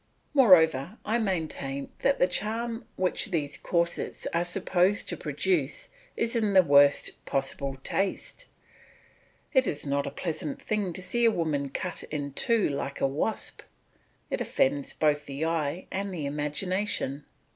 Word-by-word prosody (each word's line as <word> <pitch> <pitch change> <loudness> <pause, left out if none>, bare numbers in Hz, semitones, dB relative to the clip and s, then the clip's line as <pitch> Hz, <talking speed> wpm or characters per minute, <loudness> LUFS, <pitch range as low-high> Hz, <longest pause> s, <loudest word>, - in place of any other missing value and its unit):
Moreover, 180 - +5
I 225 +3 +1
maintain 155 -9 -3
that 275 - +2
the - - +5
charm 225 +4 -2
which 185 +2 0
these 155 -7 -2
corsets 170 -1 -1
are 170 +1 +2
supposed 180 +2 +1
to - - -2
produce 150 -1 -1 0.3
is 230 +1 0
in 215 -3 +1
the 190 -1 +7
worst 145 -2 +4
possible 135 0 -2
taste; 200 - -2 1.1
it 260 -2 +4
is 150 - -2
not 140 0 0
a - - -1
pleasant 155 -1 -4
thing 210 -4 -1
to 185 - -7
see 235 +6 0
a 230 - +7
woman 155 -8 -1
cut 175 +5 -4
in 145 -2 -4
two 230 +7 +3
like 140 -1 -3
a - - +2
wasp 145 +11 -2 0.7
it - - -1
offends 275 0 0
both 150 -1 +1
the 140 +3 -3
eye 165 +1 -1
and 195 +1 -2
the 160 -6 -4
imagination. 150 +1 -2
170 Hz, 145 wpm, -28 LUFS, 145-205 Hz, 1.1 s, the